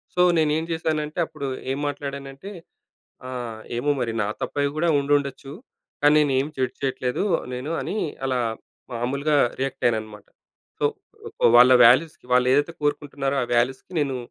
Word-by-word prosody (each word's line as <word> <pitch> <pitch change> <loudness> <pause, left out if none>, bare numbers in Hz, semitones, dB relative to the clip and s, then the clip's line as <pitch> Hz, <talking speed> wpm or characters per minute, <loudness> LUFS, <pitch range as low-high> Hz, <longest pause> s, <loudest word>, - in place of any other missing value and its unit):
So, 180 - +3 0.2
నేనేం 155 0 +2
చేశానంటే 155 0 -2
అప్పుడు 155 -3 -6 0.2
ఏం 135 - -2
మాట్లాడానంటే 140 +4 -6 0.8
ఆహ్, 120 -3 -6 0.2
"ఏమో 145 +5 0
మరి! 115 -2 -1
నా - - -1 0.2
తప్పై 145 0 -1
కూడా 170 +2 +1
ఉండుండొచ్చు. 140 -1 -1 0.5
కానీ, 145 +1 +6
నేను 145 -2 +2
ఏమి 145 +3 -3
జడ్జ్ 130 -1 -2
చేయట్లేదు 130 +4 -1 0.3
నేను" 135 +6 -4
అని 210 - -4 0.3
అలా 130 -1 0 0.5
మాములుగా 140 +5 0 0.2
రియాక్ట్ 135 -1 -3
అయ్యానన్నమాట. 110 -2 -2 0.5
సో, - - -2 0.7
వాళ్ళ 125 +1 +8
వాల్యూస్‌కి 130 +4 +4
వాళ్ళు 125 0 +4
ఏదైతే 145 +4 +1
కోరుకుంటున్నారో 140 -2 -1
ఆ - - 0
వాల్యూస్‌కి 130 +8 0
నేను 135 -3 -1
140 Hz, 140 wpm, -23 LUFS, 125-150 Hz, 0.8 s, వాళ్ళ